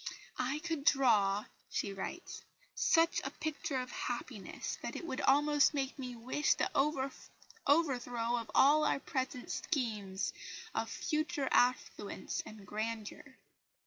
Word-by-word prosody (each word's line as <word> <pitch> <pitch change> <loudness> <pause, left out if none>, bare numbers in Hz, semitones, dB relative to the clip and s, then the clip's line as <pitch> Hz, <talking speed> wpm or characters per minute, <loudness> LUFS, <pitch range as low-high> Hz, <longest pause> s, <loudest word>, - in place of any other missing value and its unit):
"I 260 +3 0
could 325 -4 -2
draw," 210 -8 +4 0.2
she 200 - -2
writes, 195 - -6 0.3
"such 330 +1 +3
a - - -2
picture 295 -3 -3
of 255 0 -3
happiness 240 -3 -4
that - - -4
it - - -5
would 265 -6 -3
almost 295 +2 +4
make 275 0 -2
me 250 -2 -5
wish 255 +6 +1
the - - 0
overthrow 270 - 0
of 230 - -5
all 295 +3 +6
our 300 - +2
present 260 -2 -3
schemes 210 - -2 0.4
of - - -1
future 305 -3 -1
affluence 245 -4 +1
and 215 -2 -10
grandeur." 220 +5 -5
260 Hz, 125 wpm, -34 LUFS, 230-295 Hz, 0.4 s, all